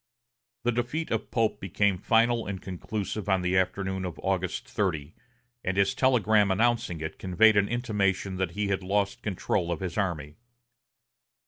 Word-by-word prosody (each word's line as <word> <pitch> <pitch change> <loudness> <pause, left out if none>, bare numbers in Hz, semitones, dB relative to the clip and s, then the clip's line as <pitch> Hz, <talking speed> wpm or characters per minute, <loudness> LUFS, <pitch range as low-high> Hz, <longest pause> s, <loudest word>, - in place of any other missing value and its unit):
The 120 - +2
defeat 120 +7 -2
of - - -1
Pope 115 -2 0
became 95 0 +1
final 115 +2 +2
and 100 -2 -4
conclusive 100 +2 -4
on 95 -2 +2
the 90 +1 +1
afternoon 95 +1 0
of 90 -2 -5
August 95 -2 -1
30, 80 -7 -2 0.5
and 95 +1 -1
his 100 -1 +3
telegram 110 -6 +3
announcing 110 -5 +1
it 80 0 -5
conveyed 100 +4 +4
an 100 0 +3
intimation 100 -5 0
that 95 -2 -1
he 105 -1 0
had 95 -1 0
lost 100 +1 0
control 95 -3 -1
of 85 - -2
his 95 +2 -3
army. 80 -6 -2
100 Hz, 155 wpm, -28 LUFS, 90-110 Hz, 0.5 s, conveyed